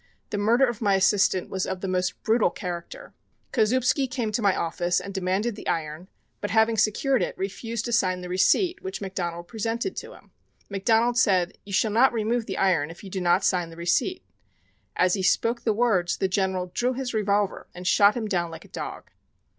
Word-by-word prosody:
The 205 - -1
murder 235 +6 +4
of 240 -2 -4
my 200 -3 +3
assistant 190 -1 +2
was 190 -1 -2
of 190 -1 -4
the 195 - -3
most 185 0 -2
brutal 225 0 +3
character. 180 - -7 0.4
Kozoubsky 255 +3 +2
came 240 -4 -2
to 215 - -1
my 200 -3 +3
office 175 +1 0
and 200 - -8
demanded 190 +4 -1
the - - -9
iron, 160 +2 -3 0.3
but 205 - -3
having 220 0 +3
secured 220 +5 +2
it, - - -2
refused 220 +4 -4
to 240 - -3
sign 185 -5 +1
the 180 - -6
receipt 345 - +2
which 380 0 -5
McDonald 175 -3 -4
presented 230 - -3
to - - -6
him. - - -19 0.4
McDonald 230 +5 +2
said: 185 -5 +2
'You 200 - -8
shall 215 +3 +2
not 240 +5 +4
remove 230 +1 -1
the 195 - -4
iron 170 -6 +2
if 165 +4 -12
you 195 - -9
do 190 - -3
not 180 +2 +3
sign 175 -3 +1
the 165 - -12
receipt.' 175 - 0 0.7
As 180 0 +3
he 195 - 0
spoke 230 +6 +1
the 225 - +3
words 205 -6 +1
the 190 - +1
General 185 -2 -1
drew 250 +1 0
his 255 -1 -4
revolver 205 -2 0
and 180 +1 -8
shot 200 +3 +5
him 225 -2 -2
down 175 -4 -1
like 165 -1 -10
a - - -18
dog. - - -7
200 Hz, 200 wpm, -25 LUFS, 185-230 Hz, 0.7 s, shot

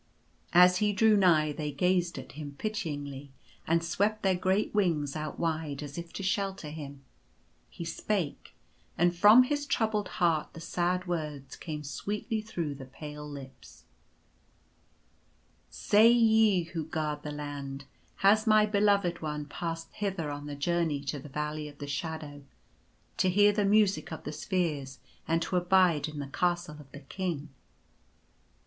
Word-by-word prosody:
As 180 +1 +7
he 210 +1 +1
drew 220 +1 +5
nigh 165 -6 +4
they 150 0 -4
gazed 175 +3 +1
at - - -8
him 145 -1 -8
pityingly 145 -10 -4 0.4
and 165 +1 +2
swept 205 +5 0
their 190 -1 +3
great 185 +3 0
wings 165 -9 +1
out 155 0 -4
wide, 155 -3 -2
as 145 -1 -8
if 170 -1 -7
to 195 - -5
shelter 190 -4 -2
him. 140 -3 -8 0.7
He 170 - -7
spake; 170 -1 -3 0.4
and 175 0 +3
from 210 +7 +8
his 290 +2 -2
troubled 220 - 0
heart 165 -3 0
the - - -9
sad 180 +2 -1
words 150 -6 -4
came 150 -3 -6
sweetly 210 - -3
through 170 -9 -4
the 135 -1 -9
pale 150 +2 -8
lips: 135 -3 -11 1.0
" - - -38
Say, 215 +3 +4
Ye 220 -5 +4
who 165 -1 -5
guard 150 -2 -2
the 150 - -5
Land, 140 -2 -6 0.4
has 215 +3 +5
my 215 -1 +6
Beloved 200 -4 +2
One 150 -1 -3
passed 165 +2 -5
hither 190 -7 -3
on 145 0 -6
the 145 - -5
journey 160 -1 0
to 145 +1 -3
the 145 - -10
Valley 150 +1 -3
of 145 -1 -12
the 145 - -6
Shadow, 145 0 -5 0.8
to 185 - +3
hear 205 +3 +5
the 205 -1 +1
Music 205 -2 +3
of 160 - -6
the 150 - -5
Spheres, 150 -5 -2 0.3
and 165 0 +1
to 180 - -1
abide 180 -4 +3
in 155 -1 -8
the 145 - -3
Castle 175 +1 -1
of 140 -2 -14
the 140 - -10
King 155 -1 -4
165 Hz, 155 wpm, -29 LUFS, 150-195 Hz, 1.0 s, from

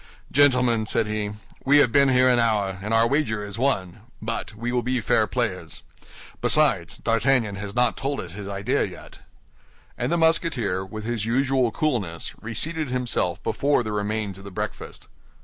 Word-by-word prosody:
"Gentlemen," 125 -5 +3
said 115 - +2
he, 105 -1 -3 0.3
"we 145 +2 +5
have 135 -5 +5
been 140 +2 +5
here 130 0 +4
an 125 -1 +4
hour, 105 -5 +1
and 105 +2 -4
our 115 0 +4
wager 115 -7 0
is 105 +2 -7
won; 100 -8 0 0.2
but 115 -1 -4
we 120 +3 -3
will 125 0 +1
be 125 +1 -1
fair 110 - +2
players. - - -3 0.6
Besides, 125 - +2
D'Artagnan 115 -1 +1
has 100 +1 -6
not 125 -1 +2
told 140 +1 -2
us 90 -2 -6
his 100 +1 -7
idea 100 0 0
yet." - - -8 0.8
And - - -1
the 170 - +2
Musketeer, 150 - +1
with 110 +3 -7
his 115 -2 -2
usual 130 0 +2
coolness, 105 - -2
reseated 150 +7 -2
himself 125 -8 -1
before 140 -3 +1
the 110 - -4
remains 105 -1 -2
of - - -12
the 100 - -8
breakfast. 95 - -6
115 Hz, 170 wpm, -24 LUFS, 105-130 Hz, 0.8 s, we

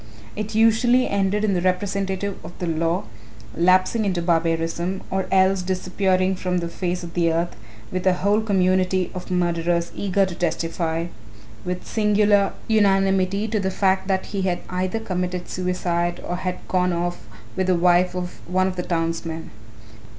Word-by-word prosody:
It 215 0 -4
usually 235 +3 +4
ended 200 +1 0
in 210 -2 +2
the 180 - 0
representative 190 +1 -1
of 165 +2 -10
the 180 - -3
law 165 +1 0 0.5
lapsing 185 +6 +3
into 190 -4 0
barbarism, 170 +2 0
or 190 0 -1
else 190 0 +4
disappearing 185 +1 0
from 180 0 -1
the 170 -1 -2
face 180 0 -3
of 170 -1 -8
the 170 -2 +2
earth, 170 +1 -1 0.4
with 185 0 -2
a 185 - +5
whole 200 +4 +2
community 185 -3 +1
of 180 - -7
murderers 170 -1 0
eager 195 0 +1
to 185 - -5
testify, 165 -1 -1 0.6
with 180 0 -4
singular 210 -2 +3
unanimity, 195 -1 +2
to 215 0 0
the 190 -1 0
fact 190 0 +1
that 190 -1 0
he 200 - -1
had 180 -2 -1
either 185 +4 -1
committed 180 -3 -3
suicide 175 -1 -1
or 175 - -2
had 185 0 -4
gone 180 -1 +1
off 175 +1 -2 0.3
with 185 -1 0
the 185 - +3
wife 180 +1 +3
of 180 0 -5
one 185 +1 +2
of 185 -1 -2
the - - 0
townsmen. 165 -1 -3
185 Hz, 160 wpm, -23 LUFS, 175-195 Hz, 0.6 s, a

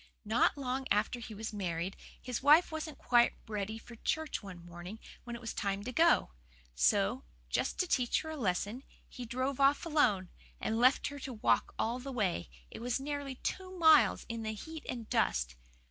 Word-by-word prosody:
"Not 225 +6 +3
long 265 -1 -2
after 210 +4 +1
he 225 -2 -8
was 220 +1 -5
married 185 -2 -2 0.2
his 250 -3 -4
wife 300 +6 +6
wasn't 315 -2 -5
quite 240 0 +4
ready 215 0 -3
for 235 +1 -12
church 315 +5 -1
one 180 -4 -10
morning 175 +4 -8 0.3
when 240 -1 -5
it - - -7
was 230 -2 -5
time 200 0 -2
to 250 - -4
go. 325 - +4 0.4
So, - - +2 0.3
just - - 0
to 365 - +1
teach 250 -7 +2
her 315 - -6
a - - -4
lesson, 210 0 -1 0.3
he 250 - -8
drove 255 +3 -2
off 275 +4 +4
alone, 235 - +2 0.3
and 225 +1 -1
left 255 +3 +5
her 285 0 -8
to 265 -1 -6
walk 215 - +1
all 235 +3 0
the 270 +2 -6
way 190 - -1 0.2
it - - -8
was 245 +2 -1
nearly 285 -1 -4
two 370 +7 -4
miles 320 -3 +6
in 230 -1 -4
the 220 0 -3
heat 320 +7 -8
and 235 -3 -4
dust. 65 - +1
240 Hz, 190 wpm, -33 LUFS, 205-280 Hz, 0.4 s, wife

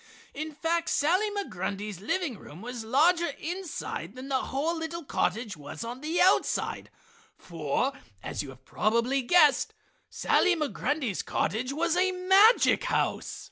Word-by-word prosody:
In 310 +2 -5
fact, 335 +2 0
Sally 365 +9 +2
Migrundy's 205 - -4
living 325 - -1
room 160 +8 -12
was 245 -1 -6
larger 330 +9 +3
inside 345 - -5
than 260 +2 -8
the 265 -1 0
whole 305 +5 -1
little 325 +1 -5
cottage 230 -5 -1
was 145 +7 -8
on 240 +3 -6
the 315 +3 -1
outside, 370 +2 +2 0.5
for, 170 - -2 0.3
as - - -3
you 145 - -7
have 130 0 -14
probably 235 +5 +1
guessed, 300 +1 +4 0.3
Sally 370 -2 +2
Migrundy's 290 - -1
cottage 250 +5 -1
was 325 +3 0
a 370 +1 +3
magic 385 +6 +5
house. - - -1
285 Hz, 140 wpm, -28 LUFS, 230-340 Hz, 0.5 s, magic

